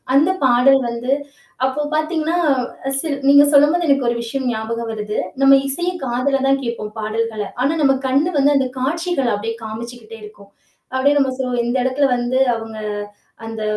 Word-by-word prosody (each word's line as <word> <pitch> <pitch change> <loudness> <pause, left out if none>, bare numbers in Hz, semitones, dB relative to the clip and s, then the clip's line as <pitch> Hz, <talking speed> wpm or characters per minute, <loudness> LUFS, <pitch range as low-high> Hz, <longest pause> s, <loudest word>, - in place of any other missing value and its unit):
அந்த 305 +6 +4
பாடல் 260 +2 +5
வந்து 235 +2 -3 0.5
அப்போ 265 +3 -1
பார்த்தீங்கன்னா 315 +1 -1 0.6
சில் 285 -2 -2
நீங்க 285 +1 +7
சொல்லும்போது 300 +5 +4
எனக்கு 275 -3 +2
ஒரு 240 - -1
விஷயம் 260 +3 -3
ஞாபகம் 230 +1 -4
வருது. 210 -1 -4 0.2
நம்ம 275 0 +7
இசைய 345 +6 -1
காதுல 255 +3 0
தான் 275 0 +2
கேட்போம் 235 -3 -5
பாடல்கள. 220 0 -2 0.2
ஆனா 275 +5 +2
நம்ம 275 -2 +4
கண் 270 +3 +2 0.2
வந்து 285 +1 +3
அந்த 265 -1 +1
காட்சிகள 315 +1 -1
அப்பிடியே 225 +3 -4
காமிச்சிக்கிட்டே 225 +1 -8
இருக்கும். 205 -1 -14 0.4
அப்பிடியே 275 +3 +2
நம்ம 270 -2 +1
சொல்லுவோம், 250 -2 -1
இந்த 240 +2 0
இடத்தில 260 +2 +1
வந்து 245 +1 -1 0.2
அவுங்க 225 -1 -7 0.7
அந்த 225 -1 -6
260 Hz, 155 wpm, -19 LUFS, 230-280 Hz, 0.7 s, நீங்க